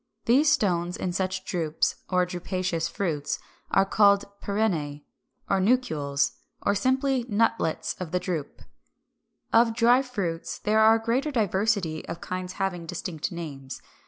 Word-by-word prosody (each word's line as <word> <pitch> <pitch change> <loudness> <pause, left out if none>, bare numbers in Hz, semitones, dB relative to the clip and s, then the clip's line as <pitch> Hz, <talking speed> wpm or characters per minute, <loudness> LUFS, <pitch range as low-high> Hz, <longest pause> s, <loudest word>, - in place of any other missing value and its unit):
These 280 +6 +5
stones 180 - +1
in 180 - -2
such 185 0 -2
drupes, 160 -3 0
or 180 -1 +3
drupaceous 180 -2 -2
fruits, 155 -7 -2 0.3
are 195 - +4
called 200 0 +4 0.2
Pyrenæ, 165 -9 -1 0.4
or 195 - +2
Nucules, 160 - +1 0.3
or 200 - +2
simply 260 +4 +1
Nutlets 215 -6 +1
of 180 -3 -4
the 180 - 0
drupe. 165 -6 -4 0.9
358. 225 - +7
Of 230 -1 0
Dry 240 +2 +5
fruits, 195 -11 -4
there 215 +1 +2
is 220 +1 +7
a 225 - -14
greater 260 +6 +1
diversity 200 - 0
of 170 - -5
kinds 185 0 -5
having 185 -4 -3
distinct 175 0 -4
names. 140 -6 -7
190 Hz, 140 wpm, -26 LUFS, 170-220 Hz, 0.9 s, 358